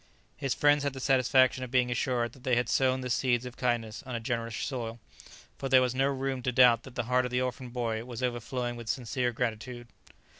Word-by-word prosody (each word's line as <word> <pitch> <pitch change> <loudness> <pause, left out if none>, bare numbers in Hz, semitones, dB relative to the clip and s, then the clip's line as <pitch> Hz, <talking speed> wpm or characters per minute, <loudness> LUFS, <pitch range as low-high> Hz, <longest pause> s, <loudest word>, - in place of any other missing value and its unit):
His 135 -3 -2
friends 145 0 +4
had 140 -1 -1
the 135 - -7
satisfaction 130 0 +3
of 130 - -6
being 125 -1 +2
assured 120 -1 -1
that 130 - -17
they 130 -3 +2
had 120 -1 +1
sown 130 -1 +2
the 125 - -4
seeds 120 -1 +1
of 125 - -8
kindness 120 -2 -1
on 130 -4 -6
a - - -1
generous 115 0 -3
soil, 115 -2 -4 0.6
for 135 - -3
there 130 0 +7
was 125 -1 0
no 135 +1 +2
room 135 -1 -2
to 125 - -1
doubt 120 -2 +6
that 130 0 -13
the 120 - -1
heart 125 +2 +2
of - - -3
the 125 0 0
orphan 130 0 -3
boy 115 -2 -2
was 120 0 -7
overflowing 120 0 -2
with 120 -2 -8
sincere 125 0 -1
gratitude. 120 0 -4
125 Hz, 225 wpm, -29 LUFS, 120-130 Hz, 0.6 s, there